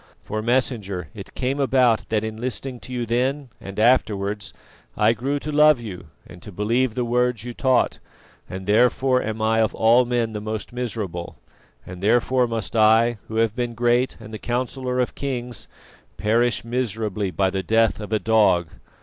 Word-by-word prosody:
For, 110 0 -3
Messenger, 110 - -1
it 100 -3 -10
came 135 +2 -1
about 130 -4 +2
that 110 -1 0
in 110 0 -4
listening 125 +2 -5
to 130 - -11
you 120 -1 -2
then 130 +4 -1
and 100 0 -9
afterwards, 105 -3 +1 0.5
I 110 +1 +4
grew 135 +6 -2
to 150 +2 -5
love 150 -2 +5
you 95 -8 -8 0.2
and 90 - -13
to 105 - -10
believe 115 +5 0
the 125 - -1
words 125 -1 0
you 120 0 -6
taught, 130 +1 +1 0.5
and 95 0 -6
therefore 125 +4 +3
am 110 0 -3
I 110 +1 +2
of 110 - 0
all 120 +3 +4
men 120 -2 0
the 105 -1 -5
most 110 +2 -5
miserable, 105 -8 -4 0.5
and 90 0 -9
therefore 120 +4 +2
must 115 -1 -4
I, 110 +1 +4
who 110 - -7
have 115 -1 +1
been 120 -1 -3
great 120 +2 +1
and 110 -1 -11
the 110 - -5
councillor 125 +2 -2
of 125 - 0
kings, 125 -5 -5 0.5
perish 115 +2 +1
miserably 110 -5 -2
by 95 +1 0
the 95 - -2
death 110 +2 +2
of 105 0 -7
a 110 - +3
dog. 105 -7 +3
115 Hz, 175 wpm, -23 LUFS, 105-125 Hz, 0.5 s, love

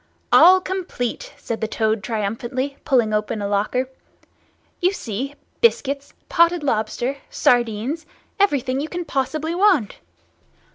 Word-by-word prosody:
"All 365 +4 +8
complete!" 375 - -4
said 230 - -5
the 220 - 0
Toad 220 -1 0
triumphantly, 235 +6 -3
pulling 235 -6 +2
open 210 +1 -1
a 200 - -2
locker. 210 +6 0 0.9
"You 365 +2 +3
see—biscuits, 280 - -2
potted 340 -1 +3
lobster, 240 +2 -1
sardines—everything 260 - 0
you 310 - -4
can 350 -1 -4
possibly 310 +3 -2
want. 360 - +2
265 Hz, 105 wpm, -22 LUFS, 225-335 Hz, 0.9 s, All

